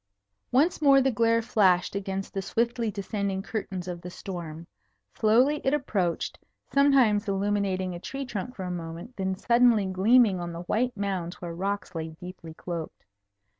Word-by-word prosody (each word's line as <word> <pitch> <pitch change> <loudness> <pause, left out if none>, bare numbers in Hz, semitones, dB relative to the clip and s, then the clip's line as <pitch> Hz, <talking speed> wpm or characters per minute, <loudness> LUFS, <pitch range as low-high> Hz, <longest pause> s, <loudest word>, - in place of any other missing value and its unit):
Once 305 +7 +3
more 275 -2 +7
the 265 0 +2
glare 230 0 +2
flashed 190 -7 +3
against 195 -1 -4
the 195 - -2
swiftly 235 +2 0
descending 200 -1 -3
curtains 195 -4 -4
of 175 -1 -5
the 180 - -7
storm. 170 -3 -7 0.5
Slowly 250 +8 +3
it 270 +2 +2
approached, 195 - -1 0.3
sometimes 260 -7 +4
illuminating 195 -2 0
a 175 - -6
tree 270 +9 -5
trunk 250 +1 -5
for 190 - -6
a 180 - -3
moment, 170 +7 -7
then 190 -1 -1
suddenly 235 0 +4
gleaming 195 +2 +4
on 175 -1 -5
the 170 +1 -6
white 235 +5 -1
mounds 185 -3 -3
where 170 -1 -6
rocks 195 +2 -3
lay 160 -1 -4
deeply 180 -3 -9
cloaked. 170 -2 -6
200 Hz, 160 wpm, -27 LUFS, 180-235 Hz, 0.5 s, more